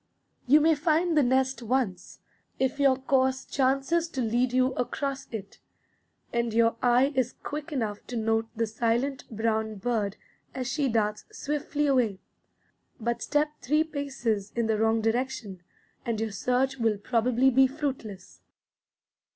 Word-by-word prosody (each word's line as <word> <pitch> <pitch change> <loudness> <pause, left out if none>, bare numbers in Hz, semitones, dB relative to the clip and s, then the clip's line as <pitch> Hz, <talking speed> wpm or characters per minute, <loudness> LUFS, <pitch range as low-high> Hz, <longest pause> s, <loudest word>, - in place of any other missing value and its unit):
You 295 +4 +6
may 320 +1 +5
find 320 +3 +1
the 300 - +5
nest 260 -1 +1
once, 235 -5 -2 0.4
if 265 +1 0
your 275 -2 +5
course 265 0 +1
chances 275 +5 +1
to 265 -5 -3
lead 240 +2 +1
you 255 +1 +2
across 270 +2 -3
it, 200 -4 -7 0.7
and 235 -2 0
your 230 0 +4
eye 250 +4 +3
is 255 -2 0
quick 300 +2 -5
enough 220 -7 -2
to 245 - -4
note 225 0 +1
the 230 +1 +1
silent 235 +5 -1
brown 220 -1 -1
bird 210 -1 -1 0.4
as 260 -1 -3
she 280 +1 0
darts 210 -2 0
swiftly 295 -4 -2
away; 245 -9 +2 0.8
but 235 +1 -2
step 295 +1 +1
three 300 +5 +2
paces 265 -9 -3
in 235 -1 +1
the 220 -1 0
wrong 225 0 +2
direction, 225 -4 -2 0.4
and 230 -4 -2
your 225 -1 -2
search 250 +5 0
will 225 -3 +2
probably 245 +4 +2
be 265 +1 +5
fruitless. 230 - -5
250 Hz, 145 wpm, -27 LUFS, 225-270 Hz, 0.8 s, You